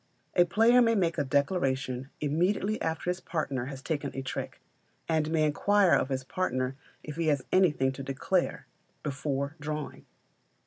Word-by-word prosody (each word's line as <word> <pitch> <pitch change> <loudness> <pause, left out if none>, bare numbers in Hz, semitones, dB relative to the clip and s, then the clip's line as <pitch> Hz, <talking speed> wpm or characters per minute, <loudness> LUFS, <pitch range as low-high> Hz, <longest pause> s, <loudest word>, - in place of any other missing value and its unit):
A 175 - +6
player 225 +7 +5
may 230 -1 +4
make 170 -5 +1
a - - +2
declaration 135 -3 0
immediately 180 +8 0
after 160 +2 -1
his 180 - -4
partner 145 -8 -2
has 135 0 -7
taken 145 -3 -2
a 135 - -3
trick, 130 - -5 0.5
and 155 -2 +1
may 160 -1 +2
inquire 195 +5 +3
of 130 - +3
his 130 -1 -2
partner 130 -5 -1 0.3
if 150 0 -7
he 165 -1 0
has 145 -4 +1
anything 150 -8 +3
to 135 - -7
declare, 140 +7 -1 0.4
before 140 0 -2
drawing. 150 0 -5
150 Hz, 160 wpm, -29 LUFS, 135-180 Hz, 0.5 s, A